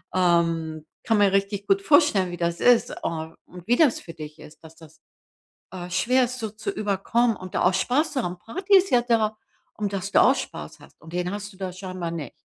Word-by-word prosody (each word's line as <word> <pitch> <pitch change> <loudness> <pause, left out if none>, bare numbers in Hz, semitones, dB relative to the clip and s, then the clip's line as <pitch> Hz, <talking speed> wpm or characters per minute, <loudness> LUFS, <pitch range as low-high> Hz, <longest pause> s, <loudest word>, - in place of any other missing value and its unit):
ähm, 165 -3 +1 0.2
kann 225 -2 +2
mir 200 -1 +4
richtig 200 0 -1
gut 195 0 +3
vorstellen, 250 - +4
wie 175 - -6
das 170 0 -2
ist 245 -1 +3
und 160 0 -4 0.3
wie 240 - +4
das 295 -2 +3
für 165 - -11
dich 155 -1 -10
ist, 150 - -15
dass 160 0 -14
das, 160 -2 -17 0.7
äh, 180 -1 -7
schwer 255 +8 +2
ist 255 +1 -5
so 220 -1 -3
zu 215 -1 -5
überkommen 210 +3 0
und 185 0 -10
da - - +1
auch 180 +1 +3
Spaß 265 - +1
zu 265 - 0
haben. 175 0 -4
Party 380 - +2
ist 385 0 +3
ja 245 -1 +4
da, 225 -3 +1 0.4
um 210 -1 -2
dass 195 0 -4
du - - +5
auch 265 - +5
Spaß - - -7
hast. - - -19
Und 160 0 -14
den 180 0 -2
hast 205 0 -6
du - - -18
da 190 -2 -4
scheinbar 185 -2 -6
nicht. 160 -4 -6
195 Hz, 220 wpm, -24 LUFS, 175-230 Hz, 0.7 s, du